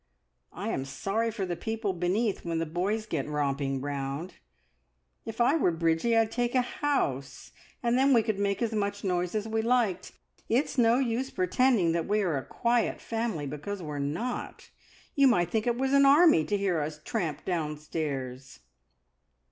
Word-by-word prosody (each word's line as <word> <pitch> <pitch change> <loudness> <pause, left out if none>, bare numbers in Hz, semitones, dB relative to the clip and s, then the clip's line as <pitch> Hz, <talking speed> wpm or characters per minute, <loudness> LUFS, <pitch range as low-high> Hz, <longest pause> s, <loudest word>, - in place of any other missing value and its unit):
I - - -5
am 135 - -1
sorry 195 +12 -2
for 210 -4 -3
the 175 -1 -3
people 220 +2 -2
beneath, 190 +5 0
when 170 -1 -2
the 165 - 0
boys 190 +7 -1
get 160 -10 -3
romping 140 -2 -1
round. 140 +4 -4 0.9
If 225 0 -7
I 245 +5 +4
were 275 - +3
Bridgie, 165 +7 +1
I'd 225 -1 +2
take 240 +1 -1
a 250 - +4
house, 140 - -2 0.3
and 240 +1 +2
then 275 +1 +4
we 235 -4 +5
could 215 -3 -2
make 200 +1 0
as 230 - 0
much 205 -1 -2
noise 180 0 -1
as 215 0 -1
we 220 0 0
liked. 225 -6 0 0.4
It's 250 +6 +1
no 235 -2 +4
use 255 0 -1
pretending 190 -1 +2
that 165 -1 -1
we 210 +1 +2
are 170 -5 0
a 135 - -2
quiet 235 0 0
family, 225 -10 -3
because 150 +8 -5
we're 150 -2 -5
not. 165 - -4 0.4
You 275 -1 +5
might 175 -9 +2
think 220 +1 0
it 240 0 +1
was 265 +1 0
an 280 0 +6
army, 285 - +6
to 205 - 0
hear 190 -5 0
us 150 +1 -4
tramp 175 -10 -3
downstairs!" 150 - -4
200 Hz, 175 wpm, -28 LUFS, 155-235 Hz, 0.9 s, an